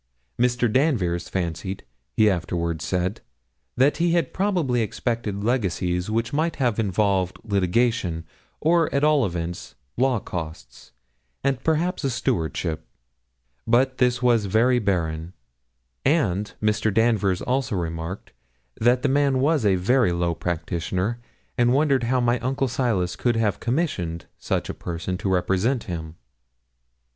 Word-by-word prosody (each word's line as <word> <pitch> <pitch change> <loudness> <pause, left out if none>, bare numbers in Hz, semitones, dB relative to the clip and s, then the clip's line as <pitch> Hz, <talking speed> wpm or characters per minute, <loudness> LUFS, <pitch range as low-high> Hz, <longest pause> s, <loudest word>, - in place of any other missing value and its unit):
Mr. 120 0 +2
Danvers 100 - +1
fancied, 95 +1 -3 0.3
he 110 - +5
afterwards 85 -4 -1
said, 90 +5 -1 0.6
that 135 +4 +4
he 170 0 +2
had 170 -6 +1
probably 175 - +1
expected 110 -2 -2
legacies 95 -6 0
which 115 +2 -1
might 160 +3 0
have 120 -5 0
involved 95 -3 +1
litigation, 100 -3 0 0.3
or, 165 +1 +3
at 140 +1 0
all 150 -6 +4
events, 85 -6 -5 0.2
law 130 0 +3
costs, 80 -9 -8 0.5
and 135 -2 0
perhaps 165 +3 0
a 135 - +1
stewardship; 80 - -2 0.8
but 130 +3 +2
this 125 0 +2
was 120 -4 +3
very 115 +5 +3
barren; 85 -5 -1 0.7
and 105 - +1
Mr. 105 0 +1
Danvers 105 -4 +2
also 125 -4 0
remarked, 85 +1 -4 0.5
that 125 +3 +3
the - - +3
man 140 0 +2
was 145 +1 +2
a 95 - +4
very 105 +3 +2
low 85 0 0
practitioner, 90 +6 -2 0.4
and 120 0 +4
wondered 135 -3 +2
how 130 +2 +2
my 120 0 +2
uncle 135 +2 -1
Silas 115 -8 0
could 120 -2 0
have 110 -3 0
commissioned 105 - -2
such - - -1
a - - -4
person 85 +2 -4
to 100 - -2
represent 95 +7 +1
him. 80 -3 -6
110 Hz, 135 wpm, -24 LUFS, 90-130 Hz, 0.8 s, he